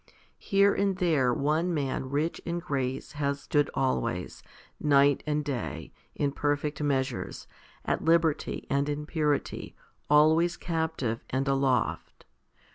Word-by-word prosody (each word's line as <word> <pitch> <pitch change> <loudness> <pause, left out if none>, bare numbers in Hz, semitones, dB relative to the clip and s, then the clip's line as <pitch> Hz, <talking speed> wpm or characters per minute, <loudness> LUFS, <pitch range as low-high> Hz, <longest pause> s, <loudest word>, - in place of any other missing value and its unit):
Here 200 0 +3
and 195 -2 0
there 155 -9 +2
one 155 +7 0
man 135 -2 -2
rich 150 +4 -1
in 170 0 -2
grace 135 -6 -3
has 140 -1 -2
stood 145 -1 +1
always, 115 -8 -1 0.4
night 140 -1 +4
and 150 -1 0
day, 130 -6 -4 0.2
in 140 -1 0
perfect 145 +1 -1
measures, 135 -3 -2 0.4
at - - -1
liberty 165 -2 +1
and 140 +1 0
in 150 0 -3
purity, 150 -2 -1 0.3
always 160 +4 +4
captive 160 -9 -2
and 135 +2 -1
aloft. 135 -3 0
145 Hz, 120 wpm, -28 LUFS, 135-160 Hz, 0.4 s, night